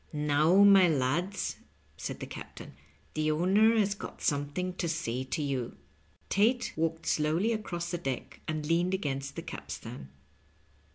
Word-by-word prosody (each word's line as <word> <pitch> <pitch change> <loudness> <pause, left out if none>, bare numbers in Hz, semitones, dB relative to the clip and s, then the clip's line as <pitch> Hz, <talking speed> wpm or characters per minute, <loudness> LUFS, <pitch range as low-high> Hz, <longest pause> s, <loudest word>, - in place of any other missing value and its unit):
"Now, 150 +6 +4
my 195 -3 +7
lads," 160 +7 0 0.4
said - - -6
the - - -3
captain, - - -9 0.4
"the 155 0 0
owner 195 +8 +4
has 205 -2 +3
got 205 - -9
something 145 +6 -1
to 170 - -1
say 130 -6 -2
to 150 +3 -2
you." 130 -4 -3 0.5
Tate 235 +4 +2
walked 165 +1 -1
slowly 160 +9 +1
across 175 -6 -4
the 175 - -2
deck 135 -6 -4
and 155 -1 -2
leaned 175 +4 +2
against 140 -6 -3
the - - -5
capstan. 70 -1 -8
165 Hz, 145 wpm, -30 LUFS, 145-190 Hz, 0.5 s, my